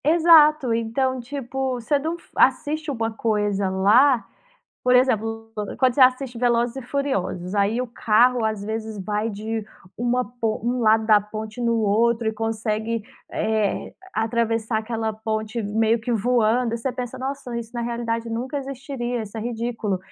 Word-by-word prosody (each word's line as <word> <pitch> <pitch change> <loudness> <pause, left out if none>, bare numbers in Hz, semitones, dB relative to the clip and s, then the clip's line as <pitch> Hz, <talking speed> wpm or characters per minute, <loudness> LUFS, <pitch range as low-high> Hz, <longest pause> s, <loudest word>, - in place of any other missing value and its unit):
Exato. 305 -4 +6
Então, 255 +3 0
tipo, 265 0 -3
você 260 +5 +1
não 320 +4 -3
f - - -22
assiste 310 +1 +2
uma 225 -3 -2
coisa 205 -3 0
lá 225 +7 +4 0.6
por 250 0 +3
exemplo, 225 -3 +1 0.3
quando 255 -2 +4
você 280 - 0
assiste 255 -1 +4
Velozes 240 0 +1
e - - -3
Furiosos, 220 -9 -2
aí 205 +5 +2
o 255 - -6
carro, 235 +1 +3
às 215 -2 -1
vezes, 220 0 -4
vai 210 +2 -1
de 220 +1 -4 0.3
uma 245 +1 +1
po 230 -3 -3
um 245 +1 0
lado 220 -1 +4
da 215 -1 +5
ponte 215 +3 -7
no 235 -1 +1
outro. 225 +2 +2
E - - -1
consegue, 220 0 -2 0.3
eh, 215 -2 -1 0.2
atravessar 225 0 0
aquela 220 0 -2
ponte 220 +1 -3
meio 220 +2 +1
que 240 +2 -2
voando. 235 +1 +2
E - - -3
você 255 +3 -2
pensa: 250 +1 -5
“Nossa, 260 -2 -4
isso 230 -1 -8
na 240 - -2
realidade 235 -1 -2
nunca 255 +5 -3
existiria. 265 -3 -4
Isso 215 +1 -9
é - - -3
ridículo.” 230 -3 -2
230 Hz, 160 wpm, -23 LUFS, 220-250 Hz, 0.6 s, Exato